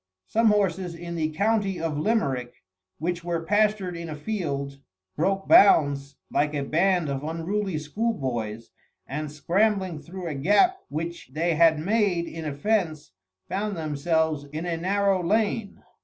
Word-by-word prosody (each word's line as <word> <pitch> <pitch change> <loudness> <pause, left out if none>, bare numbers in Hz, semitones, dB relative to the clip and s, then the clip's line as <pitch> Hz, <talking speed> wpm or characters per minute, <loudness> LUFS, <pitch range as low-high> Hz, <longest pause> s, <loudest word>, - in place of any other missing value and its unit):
Some 225 +1 +2
horses 190 -4 +1
in 170 0 -7
the 160 -2 -1
county 200 +2 0
of 160 -2 -2
Limerick, 140 - -1 0.3
which 170 +2 -2
were 170 -1 -2
pastured 205 -2 +1
in 170 -1 -6
a 155 - -5
field, 145 -6 -3 0.4
broke 195 0 0
bounds 140 -7 +5 0.2
like 150 +1 +1
a 140 - -1
band 175 +3 +2
of 140 0 -3
unruly 170 +4 -2
schoolboys, 130 - -3 0.3
and 150 +2 -4
scrambling 185 +2 +1
through 180 +4 -8
a 165 - -3
gap 210 - +3
which 165 +1 -5
they 165 +3 +1
had 160 0 +5
made 190 0 +1
in 165 -1 -7
a 150 - -2
fence, 165 -3 -1 0.4
found 200 +1 -2
themselves 155 -1 0
in 155 +4 -6
a 170 -1 -1
narrow 195 +2 +1
lane. 210 +2 0
170 Hz, 145 wpm, -26 LUFS, 150-200 Hz, 0.4 s, bounds